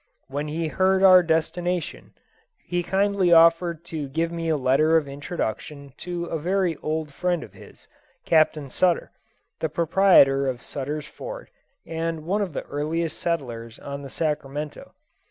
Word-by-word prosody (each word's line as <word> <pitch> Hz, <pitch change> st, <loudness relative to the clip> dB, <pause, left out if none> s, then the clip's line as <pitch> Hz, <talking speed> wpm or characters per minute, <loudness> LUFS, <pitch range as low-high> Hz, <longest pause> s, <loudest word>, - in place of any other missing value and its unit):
When 145 Hz, +2 st, -3 dB
he 160 Hz, +2 st, -2 dB
heard 190 Hz, +3 st, +2 dB
our 185 Hz, -1 st, +9 dB
destination 175 Hz, +1 st, -2 dB, 0.5 s
he 175 Hz, 0 st, -1 dB
kindly 195 Hz, 0 st, +1 dB
offered 170 Hz, 0 st, +5 dB
to 150 Hz, -3 st, -3 dB
give 165 Hz, +4 st, -1 dB
me 165 Hz, -1 st, -3 dB
a 155 Hz, -, +2 dB
letter 145 Hz, +5 st, +3 dB
of 155 Hz, -3 st, -1 dB
introduction 140 Hz, -1 st, -5 dB
to 175 Hz, -1 st, -4 dB
a 165 Hz, -2 st, -3 dB
very 180 Hz, +1 st, 0 dB
old 155 Hz, -1 st, -3 dB
friend 175 Hz, +1 st, -1 dB
of 105 Hz, -, -13 dB
his, 100 Hz, -, -16 dB, 0.4 s
Captain 155 Hz, -4 st, +2 dB
Sutter, 180 Hz, -2 st, +1 dB, 0.5 s
the 160 Hz, -, -1 dB
proprietor 155 Hz, -4 st, +4 dB
of 125 Hz, -2 st, -3 dB
Sutter's 145 Hz, +2 st, -5 dB
fort, -, -, -9 dB, 0.3 s
and 165 Hz, -1 st, -4 dB
one 200 Hz, +5 st, 0 dB
of 190 Hz, -6 st, -3 dB
the -, -, -4 dB
earliest 155 Hz, +2 st, -3 dB
settlers 120 Hz, -9 st, -3 dB
on 140 Hz, 0 st, -7 dB
the 140 Hz, -, -8 dB
Sacramento. 150 Hz, -1 st, -4 dB
160 Hz, 150 wpm, -24 LUFS, 145-175 Hz, 0.5 s, our